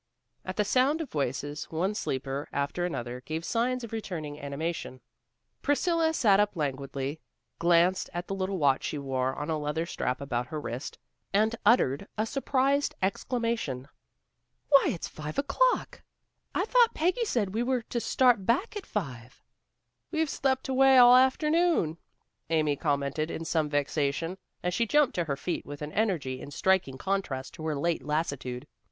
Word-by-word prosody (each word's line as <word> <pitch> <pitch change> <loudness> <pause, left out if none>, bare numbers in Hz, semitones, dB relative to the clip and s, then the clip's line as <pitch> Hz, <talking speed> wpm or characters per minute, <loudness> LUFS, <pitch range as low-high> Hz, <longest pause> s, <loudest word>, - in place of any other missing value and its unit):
At 185 - -5
the 210 - +1
sound 265 +8 +3
of 320 - -5
voices, 145 +1 -2
one 180 +6 -1
sleeper 135 -6 -3
after 140 +5 -1
another 125 -6 -5
gave 160 +4 -4
signs 250 +2 0
of 230 - -7
returning 160 -9 -5
animation. 140 -1 -4 0.6
Priscilla 325 +3 +2
sat 210 -10 +4
up 205 -1 +2
languidly, 140 -1 -3 0.4
glanced 175 +2 +3
at 175 +1 -4
the - - -3
little 190 0 -2
watch 140 -4 +2
she - - -2
wore 130 -1 -1
on 150 +2 -3
a 155 - 0
leather 150 +2 -2
strap 125 -6 -2
about 125 -3 -2
her 155 +3 -4
wrist, 125 -1 -5 0.4
and 220 +3 +3
uttered 200 - +3
a 215 - +1
surprised 275 +2 +1
exclamation. 220 - -1 0.8
"Why, 275 -2 +7
it's 170 - -2
five 150 0 -7
o'clock! - - +1 0.5
I 370 - +1
thought 475 0 +4
Peggy 365 +9 +1
said 210 - 0
we 225 - 0
were 250 -1 0
to 235 - -3
start 245 -3 +3
back 270 - +1
at 415 - -6
five." 130 - -5 0.7
"We've 320 -3 0
slept 265 -1 0
away 265 0 +5
all 245 0 +9
the 255 - +8
afternoon," 300 - +2 0.5
Amy 155 -3 +2
commented 140 +1 -1
in 165 - -5
some 160 -2 0
vexation, 145 +4 -1 0.2
as 180 0 0
she 230 +5 +1
jumped 295 +3 +3
to 175 - +1
her 140 -3 -2
feet 175 - -3
with 145 +1 -8
an 150 - -5
energy 155 - -1
in - - -8
striking 145 -2 +1
contrast 145 -8 -2
to 155 - -8
her 155 - 0
late 165 +4 -1
lassitude. 140 -5 -2
170 Hz, 165 wpm, -28 LUFS, -, 0.8 s, all